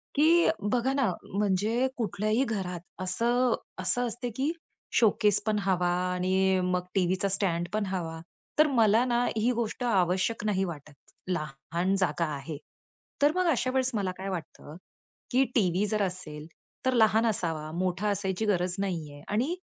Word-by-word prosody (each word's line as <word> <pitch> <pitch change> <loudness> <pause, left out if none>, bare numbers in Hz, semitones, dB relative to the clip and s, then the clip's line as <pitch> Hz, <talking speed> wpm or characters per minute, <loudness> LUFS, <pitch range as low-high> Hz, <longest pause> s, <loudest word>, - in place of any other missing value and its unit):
की 330 +4 +5 0.2
बघा 250 +2 +1
ना, 260 -9 +2 0.2
म्हणजे 210 +5 +1
कुठल्याही 215 +2 0
घरात 190 -6 -3 0.2
असं, 235 +6 +1 0.2
असं 245 0 +1
असतं 240 +2 -4
की 285 +4 +1 0.4
शोकेस 210 -3 +3
पण 215 -1 +1
हवा 180 -3 +1 0.2
आणि 190 +1 +2
मग 180 0 0
टीव्हीचा 185 +1 +1
स्टँड 175 -3 0
पण 215 -1 0
हवा. 165 -4 -3 0.4
तर 305 - +7
मला 230 -3 +4
ना 240 0 +1
ही 235 +3 +2
गोष्ट 235 +1 -2
आवश्यक 190 0 +1
नाही 195 -2 +1
वाटत. 150 -3 -8 0.3
लहान 170 +3 -2
जागा 175 -2 +1
आहे, 140 +2 -6 0.6
तर 290 +1 +5
मग 365 0 +2
अशा 255 - 0
वेळेस 260 0 +1
मला 195 -3 0
काय 195 +1 -5
वाटतं 160 -3 -7 0.6
की 260 +2 +4
टीव्ही 190 -2 +2
जर 215 0 0
असेल, 165 -5 -5 0.4
तर 260 - +3
लहान 220 0 +4
असावा, 160 -7 -2
मोठा 185 +3 0
असायची 195 +1 -1
गरज 180 -3 +1
नाही 165 -7 -3
आहे. 145 - -12
आणि 255 - 0
195 Hz, 150 wpm, -28 LUFS, 180-235 Hz, 0.6 s, तर